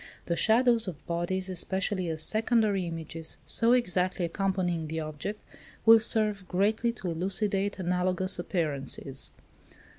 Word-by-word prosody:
The 170 Hz, -, -1 dB
shadows 230 Hz, +2 st, +3 dB
of 170 Hz, -5 st, -7 dB
bodies, 175 Hz, +2 st, -2 dB
especially, 190 Hz, 0 st, -2 dB
as 160 Hz, -1 st, 0 dB
secondary 215 Hz, -4 st, +1 dB
images, 165 Hz, -1 st, -5 dB
so 230 Hz, +1 st, +3 dB
exactly 185 Hz, -6 st, +1 dB
accompanying 175 Hz, -2 st, -1 dB
the 160 Hz, +1 st, -4 dB
object, 155 Hz, +7 st, -5 dB, 0.5 s
will 225 Hz, 0 st, +9 dB
serve 215 Hz, -3 st, +2 dB
greatly 215 Hz, +5 st, +1 dB
to 185 Hz, -6 st, -5 dB
elucidate 195 Hz, +3 st, -1 dB
analogous 180 Hz, +1 st, 0 dB
appearances. 140 Hz, -6 st, -3 dB
185 Hz, 120 wpm, -28 LUFS, 170-210 Hz, 0.5 s, will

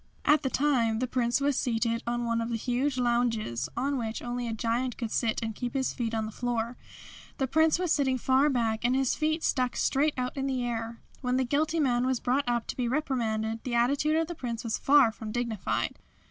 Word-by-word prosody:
At 300 Hz, 0 st, +5 dB
the 265 Hz, -, -1 dB
time 255 Hz, -6 st, +2 dB
the 255 Hz, -, 0 dB
Prince 245 Hz, 0 st, +1 dB
was 280 Hz, 0 st, +1 dB
seated 230 Hz, -1 st, 0 dB
on 240 Hz, 0 st, -1 dB
one 230 Hz, 0 st, 0 dB
of 230 Hz, -, -3 dB
the 230 Hz, -, -1 dB
huge 255 Hz, +4 st, -1 dB
lounges, 235 Hz, -, 0 dB
on 275 Hz, +2 st, 0 dB
which 225 Hz, -1 st, -3 dB
only 245 Hz, 0 st, -3 dB
a -, -, -2 dB
giant 235 Hz, +2 st, -1 dB
could 230 Hz, -3 st, -4 dB
sit 225 Hz, -3 st, 0 dB
and 225 Hz, 0 st, -3 dB
keep 245 Hz, +3 st, -5 dB
his 265 Hz, -1 st, 0 dB
feet 230 Hz, -2 st, -2 dB
on 220 Hz, -1 st, -1 dB
the 215 Hz, -, -6 dB
floor. 240 Hz, 0 st, -2 dB, 0.6 s
The 270 Hz, -, +1 dB
Prince 315 Hz, +4 st, +3 dB
was 360 Hz, -2 st, -1 dB
sitting 265 Hz, -3 st, +2 dB
far 265 Hz, +4 st, +3 dB
back 230 Hz, -4 st, 0 dB
and 245 Hz, +2 st, +2 dB
his 265 Hz, -1 st, +2 dB
feet 315 Hz, +1 st, 0 dB
stuck 255 Hz, -2 st, +1 dB
straight 295 Hz, +3 st, +1 dB
out 250 Hz, 0 st, -2 dB
in 275 Hz, -1 st, -2 dB
the 255 Hz, -2 st, -1 dB
air. 230 Hz, -1 st, -4 dB, 0.2 s
When 250 Hz, -1 st, 0 dB
the 260 Hz, -, +2 dB
guilty 305 Hz, +5 st, 0 dB
man 250 Hz, -3 st, +2 dB
was 260 Hz, -2 st, +1 dB
brought 255 Hz, +1 st, 0 dB
up 240 Hz, -1 st, 0 dB
to -, -, -3 dB
be 250 Hz, -2 st, -1 dB
reprimanded 225 Hz, -5 st, -1 dB
the 245 Hz, -2 st, -2 dB
attitude 280 Hz, +6 st, +2 dB
of 325 Hz, 0 st, +2 dB
the 345 Hz, -, -6 dB
Prince 240 Hz, -6 st, -5 dB
was 230 Hz, -2 st, -2 dB
far 275 Hz, -5 st, +5 dB
from 220 Hz, -1 st, -7 dB
dignified. 235 Hz, -4 st, -2 dB
245 Hz, 225 wpm, -28 LUFS, 230-270 Hz, 0.6 s, At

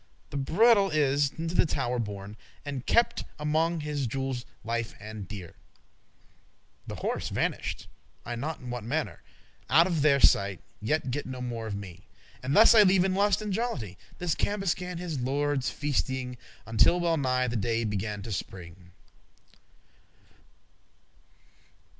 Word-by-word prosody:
The 145 Hz, -, -3 dB
bridle 200 Hz, -, +4 dB
is 145 Hz, -2 st, +2 dB
into 165 Hz, +1 st, -3 dB
the -, -, +5 dB
tower 125 Hz, -4 st, -1 dB
borne, 105 Hz, -2 st, -5 dB, 0.3 s
And 140 Hz, -3 st, -5 dB
kept 235 Hz, 0 st, +3 dB
among 160 Hz, +2 st, +1 dB
his 145 Hz, -3 st, -2 dB
jewels 130 Hz, 0 st, -3 dB, 0.2 s
lefe* 115 Hz, 0 st, -2 dB
and 105 Hz, -2 st, -8 dB
dear; 95 Hz, -3 st, -7 dB
*cherished -, -, -22 dB, 1.3 s
The -, -, -5 dB
horse -, -, -2 dB
vanish'd, -, -, -2 dB, 0.4 s
I 120 Hz, -, -4 dB
n'ot* 150 Hz, +7 st, -4 dB
in 125 Hz, -2 st, -7 dB
what 120 Hz, -2 st, -4 dB
mannere, 150 Hz, +8 st, -2 dB
*know 130 Hz, -, -10 dB
not 165 Hz, -, +9 dB
Out -, -, +5 dB
of 170 Hz, -5 st, 0 dB
their 140 Hz, -1 st, +4 dB
sight; 100 Hz, -6 st, +4 dB, 0.2 s
ye 130 Hz, +9 st, +2 dB
get 140 Hz, -2 st, -4 dB
no 130 Hz, -1 st, -6 dB
more 120 Hz, -3 st, -4 dB
of 105 Hz, -, -3 dB
me: 95 Hz, -3 st, -9 dB, 0.3 s
But 130 Hz, +2 st, -2 dB
thus 220 Hz, +7 st, +8 dB
I 220 Hz, -, +8 dB
leave 190 Hz, -2 st, +5 dB
in 190 Hz, -1 st, +1 dB
lust 200 Hz, +1 st, +2 dB
and 210 Hz, -2 st, -2 dB
jollity 150 Hz, -, -2 dB, 0.2 s
This 175 Hz, -3 st, 0 dB
Cambuscan 180 Hz, -3 st, -1 dB
his 170 Hz, -5 st, -4 dB
lordes 140 Hz, +1 st, 0 dB
feastying,* 130 Hz, -3 st, -1 dB
*entertaining 125 Hz, -, -16 dB
<25> -, -, -38 dB
Until 115 Hz, +10 st, +4 dB
well 170 Hz, -1 st, +1 dB
nigh 130 Hz, -2 st, +1 dB
the 120 Hz, -, -3 dB
day 115 Hz, +2 st, 0 dB
began 105 Hz, -1 st, -3 dB
to 115 Hz, -, -6 dB
spring. 90 Hz, -1 st, -7 dB
135 Hz, 160 wpm, -28 LUFS, 115-165 Hz, 1.3 s, not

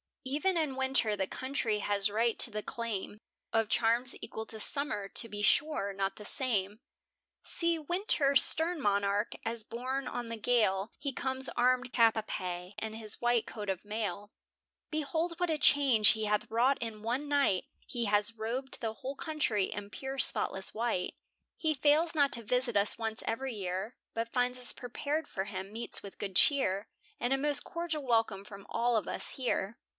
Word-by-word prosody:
E'en 305 Hz, +8 st, 0 dB
in 305 Hz, -5 st, -1 dB
winter 265 Hz, -5 st, +2 dB
the 190 Hz, -2 st, -2 dB
country 260 Hz, -5 st, -2 dB
has 205 Hz, 0 st, +1 dB
right 225 Hz, +2 st, 0 dB
to -, -, +4 dB
the 215 Hz, -1 st, -5 dB
claim 215 Hz, -3 st, -5 dB, 0.3 s
Of 225 Hz, -2 st, +1 dB
charms 240 Hz, +2 st, +2 dB
equal 220 Hz, 0 st, -6 dB
to 220 Hz, -, -8 dB
summer; 215 Hz, -5 st, +1 dB
to 230 Hz, -, +1 dB
be 205 Hz, -1 st, -5 dB
sure, 215 Hz, -5 st, +2 dB
not 195 Hz, 0 st, -2 dB
the 210 Hz, -, -10 dB
same. 210 Hz, -6 st, +2 dB, 0.6 s
See 335 Hz, -1 st, +2 dB
winter, 310 Hz, -3 st, +1 dB
stern 320 Hz, +3 st, +3 dB
monarch, 200 Hz, -1 st, 0 dB
as 225 Hz, 0 st, -2 dB
borne 255 Hz, +4 st, -4 dB
on 240 Hz, -1 st, -5 dB
the 230 Hz, -, -4 dB
gale, 215 Hz, -3 st, +1 dB
He 280 Hz, -, -3 dB
comes 265 Hz, 0 st, -2 dB
armed 250 Hz, +1 st, +1 dB
cap 230 Hz, -2 st, +5 dB
a 220 Hz, -, -1 dB
pie 180 Hz, -2 st, -5 dB
in 220 Hz, 0 st, -4 dB
his 220 Hz, -2 st, -4 dB
white 240 Hz, -1 st, +2 dB
coat 210 Hz, -2 st, -7 dB
of 190 Hz, -2 st, -3 dB
mail; 210 Hz, -1 st, -4 dB, 0.6 s
Behold 320 Hz, +2 st, -2 dB
what 355 Hz, -1 st, 0 dB
a 315 Hz, -, +1 dB
change 275 Hz, -8 st, +6 dB
he 220 Hz, -1 st, +2 dB
hath 210 Hz, 0 st, 0 dB
wrought 245 Hz, +5 st, +2 dB
in 220 Hz, -2 st, -5 dB
one 250 Hz, +6 st, -2 dB
night, 280 Hz, -10 st, +2 dB, 0.2 s
He 240 Hz, -2 st, -2 dB
has 205 Hz, +1 st, +2 dB
robed 240 Hz, +5 st, -5 dB
the 225 Hz, -2 st, -3 dB
whole 265 Hz, +5 st, -6 dB
country 270 Hz, -11 st, 0 dB
in 205 Hz, +1 st, -6 dB
pure 270 Hz, +3 st, -6 dB
spotless 190 Hz, -6 st, +4 dB
white. 225 Hz, -5 st, -2 dB, 0.4 s
He 315 Hz, -1 st, +1 dB
fails 305 Hz, +4 st, +3 dB
not 285 Hz, -2 st, +3 dB
to 235 Hz, -, -2 dB
visit 250 Hz, 0 st, +2 dB
us 200 Hz, +1 st, +4 dB
once 225 Hz, -1 st, -3 dB
every 255 Hz, +3 st, -2 dB
year, 195 Hz, +3 st, -4 dB, 0.2 s
But 230 Hz, 0 st, -3 dB
finds 250 Hz, 0 st, 0 dB
us 250 Hz, -, +4 dB
prepared 285 Hz, +5 st, -3 dB
for 190 Hz, -, -4 dB
him 190 Hz, -1 st, -6 dB
meets 230 Hz, +1 st, 0 dB
with 200 Hz, -, -11 dB
good 195 Hz, -2 st, -5 dB
cheer, 210 Hz, -6 st, +3 dB, 0.3 s
And 245 Hz, +2 st, 0 dB
a -, -, +2 dB
most 290 Hz, +1 st, +1 dB
cordial 335 Hz, -3 st, -4 dB
welcome 225 Hz, -5 st, +1 dB
from 200 Hz, -1 st, -12 dB
all 235 Hz, +1 st, +1 dB
of 215 Hz, -5 st, 0 dB
us -, -, +1 dB
here. 235 Hz, -4 st, -2 dB
230 Hz, 180 wpm, -31 LUFS, 210-270 Hz, 0.6 s, change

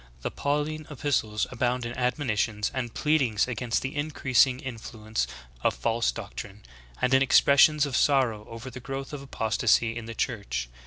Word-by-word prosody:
The -, -, -2 dB
Pauline 150 Hz, +2 st, -2 dB
epistles 130 Hz, -7 st, 0 dB
abound 125 Hz, 0 st, -1 dB
in 120 Hz, +1 st, -5 dB
admonitions 120 Hz, -5 st, 0 dB
and 125 Hz, -3 st, -3 dB
pleadings 130 Hz, -9 st, +1 dB
against 120 Hz, -1 st, -1 dB
the 135 Hz, +1 st, -4 dB
increasing 140 Hz, -4 st, +2 dB
influence 110 Hz, -3 st, -4 dB, 0.3 s
of -, -, +1 dB
false 115 Hz, 0 st, 0 dB
doctrines, 105 Hz, -2 st, -8 dB, 0.3 s
and 125 Hz, -, +1 dB
in 130 Hz, -, +6 dB
expressions 140 Hz, +2 st, +5 dB
of 140 Hz, -3 st, -3 dB
sorrow 125 Hz, -8 st, +2 dB
over 115 Hz, +3 st, -8 dB
the 130 Hz, -, -8 dB
growth 135 Hz, +3 st, -6 dB
of 145 Hz, -, -5 dB
apostasy 115 Hz, -2 st, +1 dB
in 115 Hz, -1 st, -5 dB
the 115 Hz, -, -7 dB
Church. 100 Hz, -, -2 dB
125 Hz, 155 wpm, -27 LUFS, 115-140 Hz, 0.3 s, in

